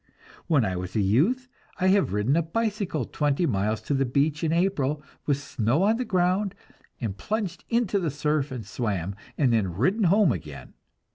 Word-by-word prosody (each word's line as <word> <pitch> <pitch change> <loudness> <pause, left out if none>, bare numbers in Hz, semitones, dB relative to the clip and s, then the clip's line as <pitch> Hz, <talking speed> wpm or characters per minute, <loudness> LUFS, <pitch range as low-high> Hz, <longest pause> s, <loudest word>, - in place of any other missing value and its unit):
When 145 -9 +3
I 95 -2 -1
was 90 0 -6
a - - +2
youth, 160 - +2 0.3
I 185 - +3
have 195 - +3
ridden 105 +8 +1
a 170 - +3
bicycle 195 - -2
twenty 145 +7 0
miles 110 -3 0
to - - -2
the 135 0 +2
beach 140 +4 0
in 160 - +1
April, 155 -5 0 0.2
with 145 -2 +2
snow 135 - 0
on 220 +3 +3
the 250 - -2
ground, 185 0 +1 0.4
and 110 -6 -3
plunged 210 - -3
into 230 -4 +1
the 170 -4 -1
surf 150 0 -1
and 125 -4 -5
swam, 100 -6 -2 0.2
and 130 -5 +3
then 95 -7 0
ridden 190 - +2
home 195 -2 +5
again. 75 -7 -7
150 Hz, 185 wpm, -26 LUFS, 115-190 Hz, 0.4 s, home